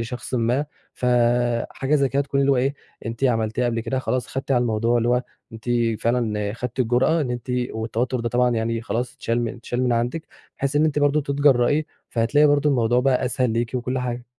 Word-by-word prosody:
لشخصٍ 120 +2 -5
ما 125 +4 +1 0.3
ف 125 - -3 0.6
حاجة 135 +3 -1
زي 140 -2 +3
كده 140 +2 +1
تكون 140 0 -1
اللي 140 0 +3
هو - - +2
إيه 135 +3 +1 0.3
أنتِ 115 +4 -3
عملتيها 115 -1 +1
قبل 115 -1 0
كده، 115 +3 -2
خلاص 125 -1 -1
خدتِ 135 +1 -6
على 125 -2 +3
الموضوع، 115 +1 +1
اللي 120 +1 0
هو 125 +1 +2 0.3
أنتِ 115 0 -11 0.4
فعلًا 110 -4 0
خدتِ 125 +2 -6
الجرأة 125 +7 +2
إن 135 -5 -2
أنتِ 120 +1 -5 0.2
والتوتر 115 +3 -2
ده 115 - -1
طبعًا 125 +1 +2
يعني 115 0 -1
خلاص 120 +2 -3
اتشال 120 -3 -1
اتشال 120 +2 -4
من 125 -1 +2
عندِك، 120 +7 -1 0.3
بحيث 140 +1 -1
إن 150 - +4
أنتِ 155 -2 +1
برضو 145 +1 +3
تتجرئي، 140 0 +2 0.2
فهتلاقي 130 +6 +3
برضو 145 0 +3
الموضوع 120 -3 +2
بقى 130 -1 +2
أسهل 125 -1 0
ليكِ 115 +1 -1
وكل 125 +1 -2
حاجة. 125 -1 -4
125 Hz, 200 wpm, -23 LUFS, 115-135 Hz, 0.6 s, إن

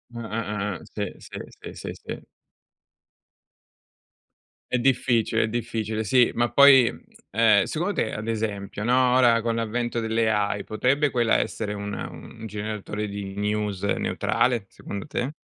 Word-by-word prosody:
Ah-ah-ah-ah, 105 -4 -3 0.2
sì, - - -1 0.2
sì, - - -10 0.2
sì, - - -8
sì, - - -6
sì. - - -8 2.5
È 125 - +2
difficile, 120 -3 +2
è - - 0
difficile, 110 -1 -2
sì, 125 +3 +4
ma 120 0 +1
poi, 135 -3 +8 0.4
ehm, 110 -2 +5
secondo 175 - -2
te, 110 - -1
ad 105 +1 -5
esempio, 105 -3 -3
no, 125 +2 +3
ora 120 -3 +5
con 115 0 -1
l'avvento 115 +1 -1
dell' 110 0 +1
AI 105 -2 0
potrebbe 135 +7 +1
quella 120 -4 +2
essere 105 -2 -2
una 100 0 -5
un 115 -1 -11
generatore 105 0 -4
di 100 -1 -6
news 105 -1 -2
neutrale, 115 +2 +1
secondo 100 +6 -7
te? 140 -1 -2
110 Hz, 135 wpm, -25 LUFS, 105-120 Hz, 2.5 s, poi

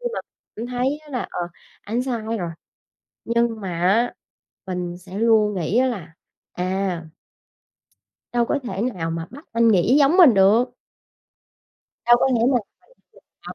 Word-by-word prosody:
khi - - -5
mà - - -2 0.4
cảm 230 - -4
thấy 250 +4 -1
á 305 - -17
là, 250 - -3
ờ, - - -4 0.4
ảnh 230 +4 -2
sai 250 -3 -2 0.2
rồi, 175 -3 -3 0.8
nhưng 235 -1 0
mà 175 -3 -4
á, 215 +7 +3 0.5
mình 180 -1 -4
sẽ 185 +2 -8
luôn 220 -2 +3
nghĩ 180 +4 0
á 260 +1 +4
là, 175 -9 -5 0.4
à 185 -2 -2 1.3
đâu 240 -1 +2
có 285 - 0
thể 195 -5 -4
nào 180 -9 -2
mà 165 0 -4
bắt 285 +6 -12
anh 230 0 +3
nghĩ 220 +6 +4
giống 290 +5 +4
mình 330 -10 +8
được? 215 +6 +4 1.3
Đâu 240 0 +7
có - - +3
nghĩ 235 - +2
là 255 - +4 0.9
phải - - -7
225 Hz, 160 wpm, -22 LUFS, 185-245 Hz, 1.3 s, mình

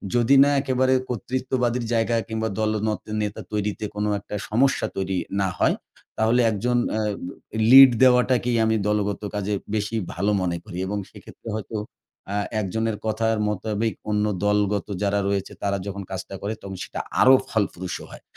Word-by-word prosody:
যদি 120 +3 +4
না 140 - +3
একেবারে 130 -1 +2 0.2
কর্তৃত্ববাদীর 125 0 -1
জায়গা 115 0 +1
কিংবা 110 0 -2
দলনেতা-, 110 0 0 0.2
নেতা 105 -1 -3
তৈরিতে 105 0 -2
কোনো 105 0 -1
একটা 105 - -8
সমস্যা 135 +6 +2
তৈরি 95 -1 -1 0.2
না 95 - +2
হয়, - - +3 0.4
তাহলে 115 +3 +3
১ 110 - -1
জন 125 0 +2
অ্যা 110 0 0 0.7
লিড 135 0 +11
দেওয়াটাকেই 125 -1 +4
আমি 110 0 +2
দলগত 105 -1 0
কাজে 105 0 -1 0.2
বেশি 105 +1 -2 0.2
ভালো 100 +4 0
মনে 85 -2 -1
করি। 90 - -9
এবং 105 +2 -2
সেক্ষেত্রে - - -14
হয়তো 110 +1 -6 0.6
আ - - -1 0.2
১ 100 - -2
জনের 110 -1 -1
কথার 110 +1 +1
মোতাবেক 105 +2 -1 0.2
অন্য 105 0 +1 0.2
দলগত 105 -1 +1 0.2
যারা 100 0 +1
রয়েছে, 100 -1 -2
তারা 100 0 0
যখন 100 0 -5
কাজটা 95 +1 -5
করে 105 +2 -2
তখন 95 -1 -7
সেটা - - -6 0.2
আরো 130 - +8 0.2
ফলপ্রসু 95 -5 -2
হয়। - - -12
110 Hz, 160 wpm, -24 LUFS, 100-120 Hz, 0.7 s, লিড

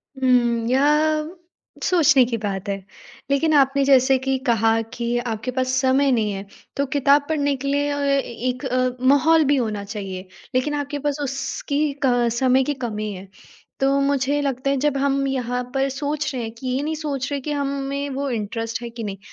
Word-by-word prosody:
हुँ। 240 -3 +2
यह, 305 +4 +2 0.5
सोचने 320 -7 +5
की 235 -1 -2
बात 195 0 -3
है, 200 - -1 0.5
लेकिन 310 +3 +2
आपने 275 -1 +4
जैसे 265 -1 +5
कि 265 0 0
कहा 225 -1 +3
कि 240 0 -1
आपके 235 0 -3
पास 255 0 -1
समय 265 +1 +3
नहीं 215 -4 +1
है, 195 0 -5 0.3
तो 280 - 0
किताब 285 +1 +4
पढ़ने 285 -3 +1
के 275 +1 -5
लिए 285 +1 +1
अ, 285 - -2
एक 255 -2 -1
अ, 255 -1 0
माहौल 315 +3 +5
भी 285 +1 +3
होना 215 -5 -2
चाहिए। 195 -2 -6 0.3
लेकिन 295 +4 +1
आपके 290 0 -3
पास 290 0 -2
उसकी 280 +2 -2
क 245 -2 +3
समय 260 0 +4
की 290 +2 -1
कमी 210 -1 -4
है। 190 +1 -9 0.5
तो 275 +1 +2
मुझे 280 +1 +1
लगता 275 -1 -1
है, 275 - +1
जब 295 -2 +2
हम 275 0 +1
यहाँ 250 -2 -2
पर 270 0 +1
सोच 290 +2 -2
रहे 245 -3 -3
हैं 225 - -5
कि 245 +3 -8
ये 255 +2 0
नहीं 315 +1 -2
सोच 280 -4 -3
रहे 280 - -1
कि 300 - -4
हमें 280 0 -2
वो 275 +1 -2
इंटरेस्ट 225 0 -3
है, 235 - -5
कि 230 0 -7
नहीं? 200 -2 -5
270 Hz, 190 wpm, -22 LUFS, 240-285 Hz, 0.5 s, सोचने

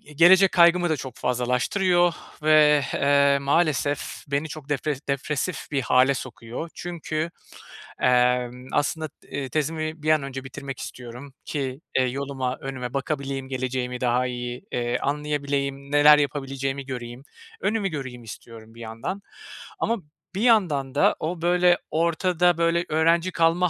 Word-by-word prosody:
gelecek 190 +5 +7
kaygımı 175 0 +5
da 155 - +2
çok 130 -3 -7
fazlalaştırıyor 165 - +1 0.3
ve, 150 -1 +6
eee, 140 0 +4
maalesef 145 -1 0
beni 140 +2 -1
çok 150 -1 -9
depre 145 +1 -1
depresif 150 +5 -2
bir 140 - +1
hâle 130 +3 +4
sokuyor. 125 +4 -7
Çünkü, 165 -2 -4 0.7
emm, 125 0 +2
aslında, 155 +2 0 0.2
ııı, 135 -2 -3
tezimi 155 +2 -2
bir 155 - +3
an 155 -2 +3
önce 135 -1 -6
bitirmek 135 +1 -7
istiyorum 125 +3 -9
ki, 135 -1 -4 0.2
eee, 130 - +4
yoluma, 130 0 -2
önüme 130 -2 -5
bakabileyim, 135 -1 -3
geleceğimi 130 -1 -3
daha 125 +1 +2
iyi, 120 +5 -5
eee, 120 0 -1
anlayabileyim, 140 -1 -2
neler 145 +1 +7
yapabileceğimi 135 -1 -2
göreyim, 125 -1 -7 0.4
önümü 210 -2 0
göreyim 130 -6 -6
istiyorum, 115 0 -11
bir 115 - -11
yandan. 115 - -5 0.6
Ama, 230 -7 0 0.4
bir 195 - -2
yandan 170 - +2
da - - +4
o, 165 +2 -3
böyle, 175 +1 +4
ortada, 170 +1 +2
böyle, 170 +1 +1
öğrenci 165 +3 +2
kalma 170 +2 +2
140 Hz, 135 wpm, -24 LUFS, 130-160 Hz, 0.7 s, gelecek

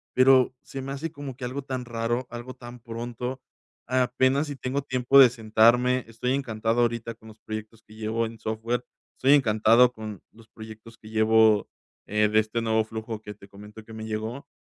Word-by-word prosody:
pero 130 0 +5
se 135 - -7
me 135 - -6
hace 145 +4 -4
como 145 -4 -8
que 125 0 -6
algo 130 +3 -4
tan 130 -2 -4
raro, 120 +1 -2
algo 120 +2 -8
tan 120 0 -11
pronto. 120 +2 -6 0.5
Apenas 130 +3 +1
y 145 - -5
tengo 130 +2 -3
tiempo 130 0 +3
de 130 -2 +9
sentarme. 120 +2 +3
Estoy 115 +3 -2
encantado 115 -3 -1
ahorita 115 -1 -1
con 110 0 -18
los 110 -1 -14
proyectos 110 +1 -8
que 105 - -18
llevo 110 +1 -1
en 115 0 -8
software 110 +3 -2 0.3
estoy 135 +2 +4
encantado 115 -2 +5
con 110 -4 -8
los 110 0 -19
proyectos 110 0 -12
que 110 - -14
llevo, 110 -1 +4 0.4
eh, 105 0 +1
de 110 +1 +4
este 110 +2 -1
nuevo 110 -1 +1
flujo 110 0 -6
que 105 -1 -8
te 100 -1 -17
comento 105 +2 -12
que 110 - -15
me 110 0 -7
llegó. 110 +5 -5
115 Hz, 190 wpm, -26 LUFS, 110-125 Hz, 0.5 s, de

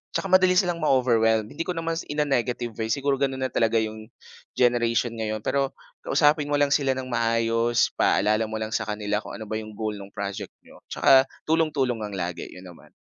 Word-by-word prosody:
Tsaka 195 - -2
madali 185 -1 +5
silang 180 -2 +2
ma-overwhelmed. 115 -6 +2
Hindi 160 - -5
ko 180 - -2
naman 165 0 -2
s - - -9
in 150 0 0
a - - -4
negative 120 -3 -1
way, 110 - -1
siguro 140 +3 0
gano’n 135 -1 -1
na - - -16
talaga 115 0 +1
‘yong, 110 0 -6 0.5
generation 120 -1 +2
ngayon. 110 -1 -3
Pero, 140 -1 -1 0.3
kausapin 150 -1 +3
mo 145 - 0
lang 145 -1 +2
sila 135 -2 +2
ng 130 0 -5
maayos, 115 0 +1
ipaalala 110 +2 +2
mo 110 - -6
lang 110 0 -4
sa 110 - -2
kanila 105 0 -2
kung - - -9
ano 110 - -7
ba 110 - -4
‘yong 110 -1 -9
goal 110 0 -3
no'ng 100 0 -11
project 100 -1 -5
niyo. - - -17
Tsaka 135 0 +4 0.2
tulong-tulong 150 -7 +1
lang 105 -2 -5
lagi, 90 -2 -4
‘yon 90 - -12
naman. 90 -2 -14
115 Hz, 205 wpm, -25 LUFS, 110-140 Hz, 0.5 s, madali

